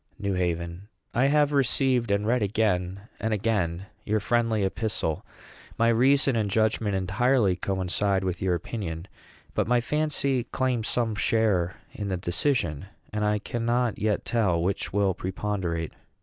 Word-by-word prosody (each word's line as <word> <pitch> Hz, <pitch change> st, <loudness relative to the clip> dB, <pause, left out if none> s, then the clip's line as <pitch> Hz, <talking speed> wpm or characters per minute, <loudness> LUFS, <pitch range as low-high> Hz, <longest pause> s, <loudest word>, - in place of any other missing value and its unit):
NEW 100 Hz, -1 st, -1 dB
HAVEN. 85 Hz, +1 st, -2 dB, 0.3 s
I 125 Hz, +4 st, +3 dB
have 150 Hz, 0 st, +3 dB
received, 130 Hz, -3 st, +2 dB
and 100 Hz, +1 st, +1 dB
read 120 Hz, +2 st, +2 dB
again 100 Hz, -3 st, 0 dB, 0.2 s
and 110 Hz, -1 st, 0 dB
again, 95 Hz, -4 st, -1 dB, 0.2 s
your 110 Hz, +1 st, +1 dB
friendly 115 Hz, -1 st, +1 dB
epistle. 95 Hz, -3 st, -1 dB, 0.5 s
My 115 Hz, 0 st, +4 dB
reason 135 Hz, +3 st, +4 dB
and 110 Hz, -3 st, 0 dB
judgment 110 Hz, -1 st, +1 dB
entirely 100 Hz, +2 st, +2 dB
coincide 95 Hz, +1 st, 0 dB
with 90 Hz, -1 st, -2 dB
your 95 Hz, -2 st, +2 dB
opinion; 85 Hz, -2 st, -5 dB, 0.5 s
but -, -, 0 dB
my 120 Hz, +1 st, +4 dB
fancy 140 Hz, -2 st, 0 dB
claims 125 Hz, -3 st, -1 dB
some 115 Hz, -3 st, 0 dB
share 100 Hz, -4 st, +1 dB, 0.2 s
in 105 Hz, -, -4 dB
the 95 Hz, -2 st, -1 dB
decision; 85 Hz, -, 0 dB, 0.3 s
and 105 Hz, 0 st, -1 dB
I 105 Hz, 0 st, +2 dB
cannot 120 Hz, +1 st, -1 dB
yet 105 Hz, -1 st, 0 dB
tell 105 Hz, -8 st, +1 dB
which 95 Hz, +3 st, -1 dB
will 100 Hz, -1 st, +2 dB
preponderate. 95 Hz, -3 st, -3 dB
105 Hz, 145 wpm, -26 LUFS, 95-120 Hz, 0.5 s, My